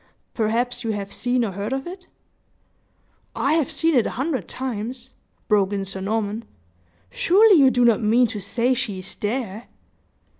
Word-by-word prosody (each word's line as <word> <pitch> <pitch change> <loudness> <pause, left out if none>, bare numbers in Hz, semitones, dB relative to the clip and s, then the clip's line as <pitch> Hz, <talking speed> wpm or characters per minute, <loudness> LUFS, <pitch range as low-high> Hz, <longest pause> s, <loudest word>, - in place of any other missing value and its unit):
Perhaps 235 +3 -1
you 225 -1 -1
have 200 -1 -5
seen 245 0 0
or 205 - -3
heard 200 +4 -4
of 270 0 -2
it?" 365 +1 -9 1.3
"I 280 - +1
have 315 -4 +1
seen 330 0 +1
it 245 -5 +3
a - - -6
hundred 270 +1 -2
times," 250 0 -5 0.4
broke 205 -2 +2
in 195 -1 -2
Sir 195 0 -6
Norman. 215 +2 -2 0.7
"Surely, 395 0 +5
you 270 -2 +7
do 245 -1 +2
not 235 0 +4
mean 230 +3 +4
to 220 -2 -4
say 235 +6 0
she 240 -6 -3
is 185 +1 -6
there?" 220 -1 -4
235 Hz, 165 wpm, -23 LUFS, 210-260 Hz, 1.3 s, you